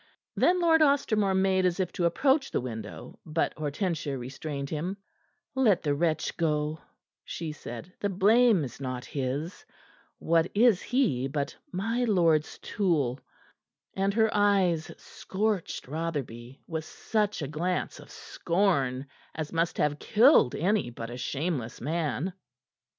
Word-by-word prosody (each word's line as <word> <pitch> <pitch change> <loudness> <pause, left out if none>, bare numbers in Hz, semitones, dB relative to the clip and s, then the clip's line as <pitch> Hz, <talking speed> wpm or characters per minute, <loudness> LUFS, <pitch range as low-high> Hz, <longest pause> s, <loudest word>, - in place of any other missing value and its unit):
Then 360 +1 +3
Lord 325 -2 +4
Ostermore 220 -9 +3
made 190 0 +2
as 180 0 +1
if 185 -2 0
to 175 - -1
approach 270 - +2
the - - -1
winnow, 110 -4 -7
but 160 +1 -1
Hortensia 155 -1 -2
restrained 140 +3 -5
him. 170 +6 -3 0.6
"Let 245 -8 +3
the 145 -2 +1
wretch 160 +2 -1
go," 155 -1 0 0.4
she 165 -2 -5
said. 150 +3 -9
"The 205 - -1
blame 210 0 +4
is 135 +1 -7
not 130 -2 -4
his. 140 +6 -4 0.5
What 165 +1 +2
is 220 -3 +5
he 220 - +1
but 140 0 -3 0.2
my 225 +7 -1
lord's 165 -8 +2
tool?" 150 - 0 0.7
And 195 +1 +1
her 220 -1 +3
eyes 195 -6 +2
scorched 205 -6 -3
Rotherby 135 -5 -5
with 160 -1 -4
such 210 -4 -1
a - - -3
glance 170 +5 -2
of - - -13
scorn 145 -8 0 0.3
as 155 0 -5
must 165 +1 0
have 150 0 +1
killed 225 - +5
any 190 - +1
but 115 0 -7
a - - -6
shameless 135 -3 -3
man. 160 +3 -2
165 Hz, 135 wpm, -28 LUFS, 145-200 Hz, 0.7 s, is